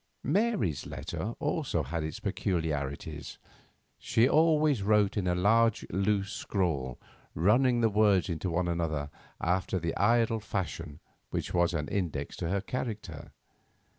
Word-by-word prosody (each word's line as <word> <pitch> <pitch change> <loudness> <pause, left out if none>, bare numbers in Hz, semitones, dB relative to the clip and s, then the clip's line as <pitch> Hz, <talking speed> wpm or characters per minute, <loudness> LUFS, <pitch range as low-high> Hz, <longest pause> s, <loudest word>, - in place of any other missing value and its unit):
Mary's 145 - 0
letter - - -5
also - - -1
had 85 -1 -3
its 80 -1 -5
peculiarities. 75 -4 -3 0.6
She 115 +2 +3
always 155 -4 +3
wrote 105 0 +3
in 100 -4 -1
a 90 - +2
large, 115 +4 +3
loose 100 +1 0
scrawl, 75 - -2 0.4
running 120 - +3
the 115 - +4
words 105 -3 +3
into 85 +1 -2
one 85 +1 0
another 80 -4 -2 0.3
after 90 +2 0
the 85 -2 -2
idle 115 +1 +3
fashion 85 -6 -4 0.3
which - - -3
was 85 -1 +2
an 75 -2 -2
index 80 -8 -2
to 85 - -3
her 100 +1 0
character. 105 - -5
95 Hz, 135 wpm, -30 LUFS, 80-110 Hz, 0.6 s, the